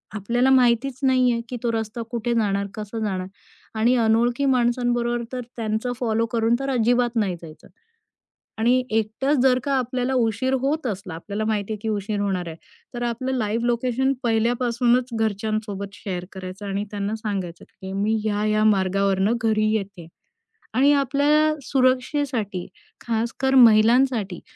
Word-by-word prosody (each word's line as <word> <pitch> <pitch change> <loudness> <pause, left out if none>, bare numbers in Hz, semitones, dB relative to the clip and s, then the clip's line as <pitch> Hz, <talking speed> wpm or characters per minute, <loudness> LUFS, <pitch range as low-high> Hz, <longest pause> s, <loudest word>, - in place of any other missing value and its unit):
आपल्याला 240 +6 +1
माहितीच 255 0 +3
नाही 255 -2 +4
आहे 235 -1 -1
की 250 - -4
तो 235 - +1
रस्ता 225 +1 -3
कुठे 235 0 -1
जाणार, 200 -3 0
कसं 215 +1 -6
जाणार 190 -4 -2 0.5
आणि 240 +3 +4
अनोळखी 235 +4 +2
माणसांबरोबर 240 -2 +1
तर 255 - -3
त्यांचं 220 +1 -2
फॉलो 230 -2 +1
करून 230 0 +2
तर 275 0 -3
अजिबात 245 -1 +1
नाही 200 -6 0
जायचं. 155 -2 -13 0.9
आणि 245 +3 +3
एकटाच 225 +7 0
जर 255 -1 +4
का 280 - -1
आपल्याला 255 0 -1
उशीर 240 +2 +1
होत 280 +1 -1
असला, 190 -5 -4
आपल्याला 200 +6 -4
माहितीये 215 -1 -2
की 225 - -3
उशीर 210 -1 -2
होणार 190 -3 -1
आहे, 160 - -8 0.4
तर 240 - -4
आपलं 240 +2 -2
लाइव्ह 225 +1 -1
लोकेशन 250 +2 +1
पहिल्यापासूनच 240 +2 +1
घरच्यांसोबत 210 -2 -2
शेअर 180 -4 -5
करायचं 190 +1 -8
आणि 200 +1 -2
त्यांना 205 0 -3
सांगायचं, 195 -6 -5
की 190 -1 -10
मी 205 +3 0
ह्या, 210 -1 0
ह्या 215 0 +2
मार्गावरून 195 0 +2
घरी 215 -1 +2
येते 195 -5 -6 0.7
आणि 275 +4 +5
आपल्या 290 +2 +2
सुरक्षेसाठी 255 - 0 0.4
खासकर 235 +4 -1
महिलांसाठी. 230 -4 +4
225 Hz, 145 wpm, -23 LUFS, 205-250 Hz, 0.9 s, आणि